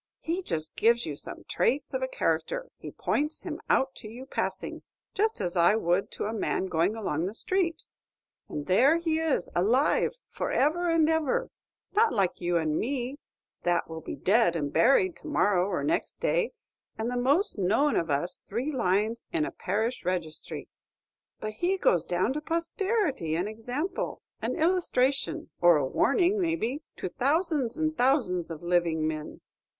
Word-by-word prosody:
He 340 +3 -2
just 160 - -3
gives 235 +1 +3
you 150 - -4
some - - -9
traits 270 +4 0
of - - -1
a - - 0
character, - - -1
he - - -8
points 300 +2 -1
him - - -5
out 265 0 +3
to - - -8
you 245 +4 -9
passing, - - -3 0.3
just 440 +2 +1
as 175 +1 -2
I 175 +4 +5
would 195 -1 +1
to - - -3
a 215 - -2
man 210 -3 -1
going 180 +3 +1
along 180 -6 -1
the 205 - -6
street, 340 +2 -1 0.6
and 145 - -4
there 265 - +5
he 325 -2 0
is 315 - 0
alive 240 - +2
for - - -3
ever 340 +5 +2
and 330 -2 +4
ever; 320 - +1 0.4
not 435 -1 +4
like 195 -7 0
you 175 0 +1
and 155 -2 0
me, 260 +2 -2 0.4
that 175 0 +1
will 160 0 -7
be - - -6
dead 200 -3 +3
and 145 -3 -2
buried 275 - +4
to - - -11
morrow 200 -10 +2
or 195 - -1
next 325 +2 -1
day, - - +1 0.5
and 220 +1 -2
the - - -2
most 275 - +2
known 220 +11 +2
of 165 - 0
us 145 +5 -1
three 245 +9 -3
lines 215 -1 0
in 325 -3 +1
a - - -4
parish 220 +6 -2
registhry, 175 -4 -4 0.7
but 215 0 -4
he 355 - 0
goes 175 - +3
down 180 +9 0
to 300 - -3
posterity 335 - -1
an 175 +4 0
example, 245 - -4 0.2
an - - -1
illustration 320 -3 +1
or 175 -2 +7
a 145 - +1
warning, 355 - +2
maybe 325 -5 -1 0.2
to - - -3
thousands 280 - 0
and 315 -2 -1
thousands 245 - +2
of 165 0 -7
living 170 -3 +1
men. 155 -1 -5
245 Hz, 170 wpm, -28 LUFS, -, 0.7 s, or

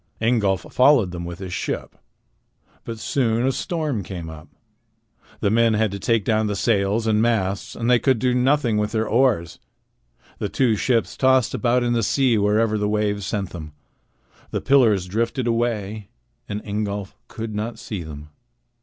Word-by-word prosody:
Ingolf 110 -5 +1
followed 125 -8 +4
them 85 -1 -6
with 85 0 -6
his 95 -2 -7
ship. - - -4 0.9
But 115 -1 -5
soon 115 0 0
a 135 - +3
storm 150 - -2
came 85 -4 -7
up. 75 -1 -11 0.9
The 100 - +2
men 115 0 +3
had 110 -1 +1
to 100 - -5
take 115 0 +1
down 110 -1 +1
the 105 - -2
sails 105 +1 +1
and 110 -1 +2
masts, 100 -4 0
and 115 - -3
they 125 -1 +5
could 130 -1 +2
do 125 +2 +1
nothing 125 -2 +2
with 105 +1 -1
their 110 -1 0
oars. 115 -9 +1 0.8
The 105 - -2
two 115 +2 +2
ships 115 +2 0
tossed 130 -2 +3
about 125 0 +1
in 120 0 +1
the 115 - +1
sea 125 +3 +2
wherever 105 +1 +2
the 105 0 0
waves 105 -2 -1
sent 100 -4 -3
them. 80 -3 -8 0.8
The - - -2
pillars 115 -9 +3
drifted 115 +6 -1
away, 110 -3 -2 0.4
and 105 +1 -5
Ingolf 100 -1 -3
could 110 -1 -6
not 110 +3 -4
see 105 -5 -6
them. 75 -1 -9
110 Hz, 170 wpm, -22 LUFS, 100-120 Hz, 0.9 s, they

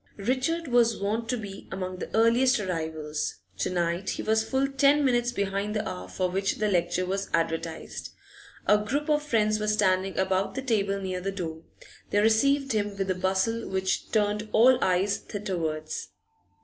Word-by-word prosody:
Richard 265 +10 -1
was 240 -2 +3
wont 220 +3 -2
to 250 - +1
be 200 -3 -8
among 185 -1 -4
the - - -6
earliest 235 +3 +4
arrivals: 160 -5 -3 0.2
to - - 0
night 175 +1 -1
he - - -3
was 220 0 +2
full 265 +4 0
ten 280 +1 +3
minutes 240 -2 +2
behind 200 -1 -2
the 210 0 -1
hour 90 0 -6
for 185 - -1
which 195 +2 -1
the 215 - 0
lecture 175 -1 +1
was 195 +2 -2
advertised. 165 - -3 0.6
A 210 +1 +5
group 285 +8 -2
of 300 0 +3
friends 215 -7 +1
were 210 - -2
standing 195 -3 +2
about 190 +2 0
the 270 - -3
table 200 -5 0
near 185 -2 -3
the 195 +2 -2
door; 165 -4 -5 0.5
they - - 0
received 275 +6 +3
him 205 -2 -1
with 195 -1 -1
a - - +3
bustle 190 +5 0
which 190 0 -1
turned 210 0 0
all 250 +3 +6
eyes 190 +2 +2
thitherwards. 160 -6 -4
200 Hz, 175 wpm, -27 LUFS, 185-230 Hz, 0.6 s, all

